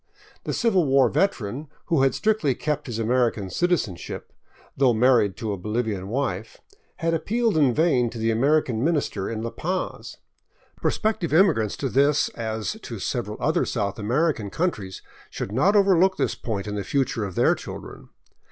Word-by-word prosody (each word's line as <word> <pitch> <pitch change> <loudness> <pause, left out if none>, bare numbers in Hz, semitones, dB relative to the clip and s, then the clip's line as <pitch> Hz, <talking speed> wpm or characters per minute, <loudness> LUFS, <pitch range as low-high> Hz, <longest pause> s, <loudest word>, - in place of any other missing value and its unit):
The - - -2
Civil 195 -8 +2
War 135 -2 +4
veteran, 140 - -1 0.2
who 160 -5 +2
had 135 0 +3
strictly 210 - +1
kept 150 +1 -2
his 120 -3 -4
American 115 -4 0
citizenship, 155 - -2 0.4
though 130 -4 +3
married 115 -4 +3
to 110 -2 -3
a - - -4
Bolivian 105 -1 -2
wife, 110 -4 -3 0.4
had 165 0 -1
appealed 225 +6 0
in 145 -5 +4
vain 130 -4 +2
to 115 - -9
the 115 0 +1
American 130 -1 +2
minister 145 - 0
in 110 -1 -4
La 115 - -3
Paz, 180 +10 -4 0.6
Pros - - +1
pective 215 -7 -1
immigrants 155 - +3
to 140 - -2
this, 140 +3 +2
as 110 -4 -4
to - - -7
several - - -3
other - - +1
South 100 +1 -2
American 120 0 0
coun 175 - 0
tries, 95 - -9 0.3
should - - -5
not 150 - +3
overlook 190 -2 +4
this - - 0
point 105 -4 -4
in 105 - -4
the 100 -1 -3
future 130 -4 -1
of 95 -3 -5
their - - +4
children. - - -9
125 Hz, 170 wpm, -24 LUFS, 110-160 Hz, 0.6 s, War